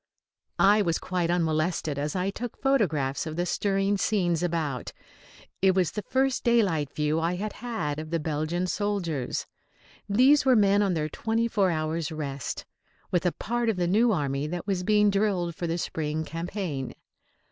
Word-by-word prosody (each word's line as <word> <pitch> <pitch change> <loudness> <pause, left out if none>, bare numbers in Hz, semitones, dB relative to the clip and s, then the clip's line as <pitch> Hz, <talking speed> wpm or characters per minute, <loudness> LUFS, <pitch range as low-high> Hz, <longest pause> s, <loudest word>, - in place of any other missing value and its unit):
I 205 +2 +5
was 170 -4 +1
quite 180 -2 -2
unmolested 160 -3 0
as 150 +3 -2
I 185 +1 0
took 240 +3 -6
photographs 165 - +1
of 155 - -5
the 175 +1 0
stirring 195 +1 0
scenes 175 -7 +1
about. 160 -7 -2 0.7
It 190 -1 +4
was 180 -5 +2
the 210 - -4
first 265 +5 0
daylight 190 - +2
view 150 +1 0
I 165 +2 0
had 210 +3 -4
had 220 -12 -3
of 155 0 -6
the 165 0 0
Belgian 155 +3 -1
soldiers. 185 - -2 0.6
These 265 +8 +5
were 260 -2 +5
men 200 -1 +4
on 195 -3 +1
their 155 -1 0
twenty 225 +8 -1
four 205 -5 +2
hours' 160 0 -1
rest, 140 -5 -4 0.5
with 180 0 +2
a - - +2
part 240 +4 -1
of 215 - 0
the 175 - +1
new 220 +7 +3
army 140 -5 -1
that 175 +2 -4
was 195 -3 -1
being 210 +2 +3
drilled 195 -4 0
for 170 +1 -4
the 165 +1 -1
spring 160 -2 -2
campaign. 165 -5 -4
175 Hz, 170 wpm, -27 LUFS, 155-205 Hz, 0.7 s, I